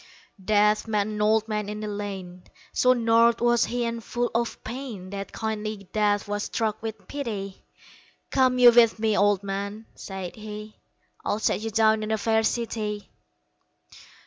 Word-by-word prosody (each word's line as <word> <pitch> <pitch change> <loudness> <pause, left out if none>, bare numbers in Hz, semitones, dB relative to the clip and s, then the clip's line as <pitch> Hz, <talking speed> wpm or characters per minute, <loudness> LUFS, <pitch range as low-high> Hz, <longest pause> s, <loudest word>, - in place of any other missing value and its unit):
Death 210 +2 +3
met 210 -2 +1
an 210 0 -4
old 220 +1 +3
man 210 -2 -2
in 210 0 -5
a - - -3
lane; 195 -3 -6 0.3
So 255 0 +4
gnarled 230 -1 +4
was 240 0 +3
he 240 0 -2
and 230 -1 -3
full 240 +2 -2
of 235 0 -2
pain 225 -6 -7
That 200 0 -5
kindly 215 -2 -4
Death 205 -1 +1
was 205 0 -2
struck 220 -1 -2
with 220 -2 -6
pity 210 -9 -5 0.7
"Come 255 -1 +3
you 245 -1 +9
with 235 -2 +5
me, 220 -1 +1
Old 205 0 +3
man," 200 +2 -4
said 190 -2 -7
he, 215 0 -8 0.5
"I'll - - 0
set 220 - +1
you 225 - -3
down 220 0 +3
in 215 - -4
a 220 - +1
fair 220 +1 +2
city." 215 -2 -2
215 Hz, 165 wpm, -26 LUFS, 205-230 Hz, 0.7 s, you